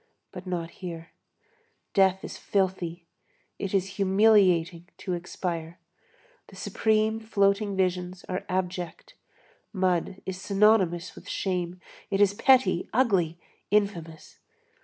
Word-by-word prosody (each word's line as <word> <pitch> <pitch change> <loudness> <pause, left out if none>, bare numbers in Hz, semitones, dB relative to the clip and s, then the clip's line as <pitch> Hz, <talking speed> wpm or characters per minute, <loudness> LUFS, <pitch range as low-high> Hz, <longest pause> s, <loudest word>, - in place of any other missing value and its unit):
But 185 -1 -9
not 170 -2 -3
here. 165 -3 -8 0.8
Death 190 -1 +3
is - - -6
filthy. 185 -3 -1 0.5
It 195 - -3
is 195 -1 -1
humiliating 185 -4 +3
to 185 - -4
expire. 170 -1 -4 0.7
The - - -15
supreme 220 0 +1
floating 200 -2 +1
visions 180 -1 -1
are 185 0 -3
abject. 180 -2 -3 0.6
Mud 185 -1 0
is 190 0 -5
synonymous 195 -4 +3
with - - -12
shame. 180 -2 -2 0.3
It 195 - 0
is 200 -1 +5
petty, 230 -5 +3
ugly, 195 -9 +2 0.3
infamous. 175 -6 -1
185 Hz, 110 wpm, -27 LUFS, 175-200 Hz, 0.8 s, is